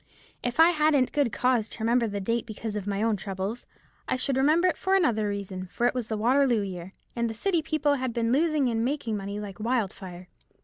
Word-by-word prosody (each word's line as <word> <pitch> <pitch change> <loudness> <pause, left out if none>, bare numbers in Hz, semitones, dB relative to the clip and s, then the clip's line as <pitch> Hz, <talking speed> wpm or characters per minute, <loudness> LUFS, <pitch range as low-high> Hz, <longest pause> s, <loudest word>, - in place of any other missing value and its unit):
If 245 +4 -3
I 325 +1 +8
hadn't 300 -5 +2
good 285 -6 +1
cause 245 -4 +1
to 220 - -7
remember 235 +1 +2
the 205 -1 -3
date 230 +4 -1
because 215 0 -5
of 205 -1 -4
my 200 +1 -1
own 225 -2 +1
troubles, 195 +4 -5 0.4
I - - 0
should 265 +1 0
remember 305 +7 +4
it 360 - +1
for 380 +1 +1
another 225 - +2
reason, 195 -2 -5
for 235 - -2
it 245 - +3
was 250 -3 -3
the 220 - -2
Waterloo 245 +1 +3
year, 185 -2 -6 0.2
and 235 -2 -1
city 345 - +1
people 310 -2 +1
had 260 -3 -1
been 230 0 0
losing 300 0 +2
and 225 -1 0
making 250 -4 -1
money 200 0 -4
like 205 -2 -8
wildfire. 195 -6 -3
235 Hz, 215 wpm, -27 LUFS, 205-275 Hz, 0.4 s, I